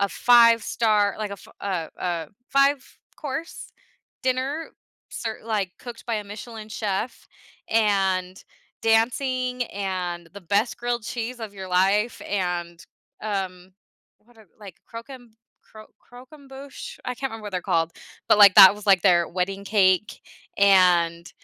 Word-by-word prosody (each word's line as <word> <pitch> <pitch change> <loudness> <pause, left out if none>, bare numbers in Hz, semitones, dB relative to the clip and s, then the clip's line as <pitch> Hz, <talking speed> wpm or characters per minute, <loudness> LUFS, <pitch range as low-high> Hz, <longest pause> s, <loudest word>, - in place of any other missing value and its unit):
a 200 - +2
five-star, 230 -3 +3
like, 215 -1 -4
a - - -6
f 200 - -16
uh, 185 -5 -3
uh, 170 -3 -2 0.2
five-course 275 +2 -2 0.5
dinner 260 +5 -2 0.4
ser 225 -2 -5
like 210 -5 -1
cooked 240 -2 -10
by 235 - -1
a 210 - -5
Michelin 215 +1 -9
chef 210 +2 -4 0.4
and 195 -4 +1 0.4
dancing, 250 +2 +1
and 180 -5 -4
the 200 - -9
best 200 +6 0
grilled 240 -1 -2
cheese 235 +3 -5
of 220 -2 -7
your 190 -1 -8
life, 195 +5 +1
and, 175 -3 -3 0.4
um, 190 -3 -4 0.5
what 240 +1 -25
are 220 - -18
like, 195 -4 -11
croquem 240 0 -10 0.3
cro 215 0 -14 0.3
croquembouche, 270 +2 -11
I 250 - -3
can't 270 +2 -4
remember 225 -1 -9
what 205 - -7
they're 180 - -2
called, 165 0 0 0.4
but, - - +5
like, 200 -2 +8
that 190 +1 +10
was, 210 0 -12
like, 190 -4 +5
their 175 -3 +4
wedding 195 +2 -3
cake 195 -1 +2 0.4
and 180 -4 +4
210 Hz, 135 wpm, -24 LUFS, 185-240 Hz, 0.5 s, that